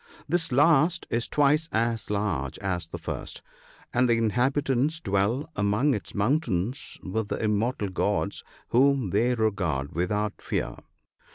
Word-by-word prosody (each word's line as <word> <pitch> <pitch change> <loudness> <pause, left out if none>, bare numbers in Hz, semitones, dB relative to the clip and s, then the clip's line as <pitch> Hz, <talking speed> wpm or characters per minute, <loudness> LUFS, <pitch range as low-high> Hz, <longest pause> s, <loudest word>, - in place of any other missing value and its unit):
This 165 0 0
last 155 +5 +4
is 115 0 0
twice 150 +2 +2
as 115 -1 0
large 100 -11 -1
as 90 -4 -3
the - - -6
first, - - -6 0.5
and 125 0 +3
the 115 - +4
inhabitants 135 +6 +1
dwell 100 +4 0
among 105 +8 +2
its 105 - -5
mountains 115 - 0
with 105 +3 -2
the - - -2
immortal 105 0 0
gods, 95 - -1 0.3
whom 130 -4 +3
they 120 +5 +2
regard 90 - -1
without 105 +5 -1
fear. - - -2
115 Hz, 130 wpm, -27 LUFS, 100-140 Hz, 0.5 s, last